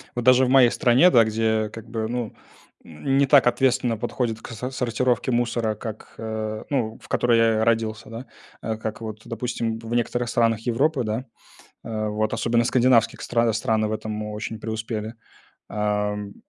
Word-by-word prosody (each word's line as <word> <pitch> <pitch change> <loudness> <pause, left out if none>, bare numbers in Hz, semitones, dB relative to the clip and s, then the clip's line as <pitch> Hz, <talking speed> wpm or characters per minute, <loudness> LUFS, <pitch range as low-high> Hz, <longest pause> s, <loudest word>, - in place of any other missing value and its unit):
Вот 120 - -2
даже 130 0 +6
в - - -1
моей 130 -3 +6
стране, 130 +9 +5
да, 115 -6 +6
где, 110 0 0
как 115 0 -10
бы, 110 -1 -2
ну, 120 -2 -3 0.5
не 135 - 0
так 135 -2 +6
ответственно 125 -1 +2
подходят 115 -1 -3
к - - -10
со 125 +3 -5
сортировке 125 0 0
мусора, 120 -2 0
как, 110 0 -8
а, 110 -1 -4
ну, 115 -6 -1
в - - -15
которой 120 -1 +2
я 110 -1 +3
родился, 110 -1 0
да, 115 +3 -7 0.4
э, 110 -1 -3
как 110 0 -5
вот, 110 -1 -7
допустим, 115 -1 -3
в 115 +1 -4
некоторых 120 0 -1
странах 115 -2 +1
Европы, 125 +4 +1
да. 110 +3 -3 0.6
А 110 -2 -3
вот 105 +1 -1
особенно 120 0 +1
скандинавских 120 -1 +3
стран 115 -1 +1
страны 110 -1 0
в - - -4
этом 110 0 -4
очень 105 +1 -5
преуспели. 110 0 -4 0.6
Ам, 105 -1 -2
115 Hz, 165 wpm, -24 LUFS, 110-120 Hz, 0.6 s, даже